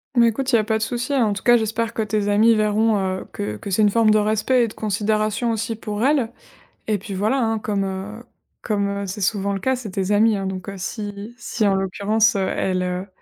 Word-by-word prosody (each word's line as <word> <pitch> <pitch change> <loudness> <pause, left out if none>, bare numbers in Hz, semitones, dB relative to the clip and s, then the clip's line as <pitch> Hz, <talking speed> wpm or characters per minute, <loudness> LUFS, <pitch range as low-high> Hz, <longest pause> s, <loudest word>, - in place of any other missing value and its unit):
Mais 235 -1 +6
écoute, 260 +4 -2
il - - +5
y - - +5
a - - +1
pas 220 +1 0
de 220 - -2
souci, 245 +4 -2
hein. 260 -4 +3
En 205 - 0
tout 200 - -6
cas, 240 0 +6
j'espère 225 +1 -2
que - - -2
tes 210 -1 -1
amies 220 +3 +5
verront, 215 +1 +2
heu, 190 -1 -2
que 105 +1 -4
que 200 - -8
c'est 195 +3 +1
une 210 - +5
forme 225 0 +3
de 215 - +5
respect 215 +4 +2
et - - +1
de 215 - -9
considération 215 +2 0
aussi 225 0 -2
pour 210 0 -4
elles. 270 -5 +2 0.6
Et 210 -2 0
puis 195 +1 -7
voilà, 215 +8 +1
hein, 225 -1 0
comme, 205 -2 -1
heu 195 +4 -5 0.4
comme, 200 -3 0
heu, 200 0 -3
c'est 195 +3 -6
souvent 200 +1 0
le 195 - -3
cas, 260 +4 +1
c'est 240 -4 -7
tes 190 +1 -2
amies, 215 +1 +4
hein. 195 - -3
Donc 190 0 -5
heu, 200 - -5
si 205 +3 -6
si 220 -3 -1
en 195 - +3
l'occurrence, 200 +3 +1
heu, 190 - 0
elles, 185 -1 -1
heu, 180 +1 -3
215 Hz, 255 wpm, -22 LUFS, 200-225 Hz, 0.6 s, Mais